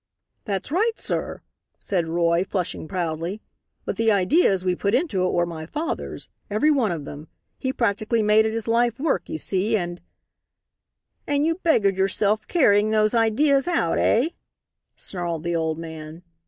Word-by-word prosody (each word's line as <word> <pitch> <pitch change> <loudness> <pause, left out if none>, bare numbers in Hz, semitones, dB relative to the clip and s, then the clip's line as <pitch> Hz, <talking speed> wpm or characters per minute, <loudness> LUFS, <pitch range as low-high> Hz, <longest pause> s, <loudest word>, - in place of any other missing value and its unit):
"That's 200 +3 -3
right, 435 +8 +2
sir," - - -3 0.3
said 175 -5 -2
Roy, 170 +1 +2
flushing 185 -5 -3
proudly; 170 +1 -3 0.5
"but - - -3
the 225 -1 +3
ideas 195 - +3
we 180 - +2
put 200 +4 0
into 255 - 0
it - - -1
were 175 0 +1
my 160 -2 -7
father's 310 - -4 0.2
every 215 +10 +2
one 250 -9 +2
of 155 -4 -4
them. 145 +2 -9 0.3
He 260 - -1
practically 225 -1 0
made 215 +1 +4
it - - -2
his 225 0 -4
life 235 +1 +1
work, 300 0 -1
you - - -3
see, 200 +7 0
and 175 -2 -5 0.6
" - - -53
"And 290 +1 +1
you 330 - +2
beggared 200 - +2
yourself 200 +2 +1
carrying 215 - +3
those 215 0 +2
ideas 270 +6 +3
out, 355 - +1
eh?" 250 +8 +3 0.7
snarled 170 -4 -4
the 170 0 -1
old 160 -1 -1
man. 160 0 -8
205 Hz, 165 wpm, -23 LUFS, 175-235 Hz, 0.7 s, made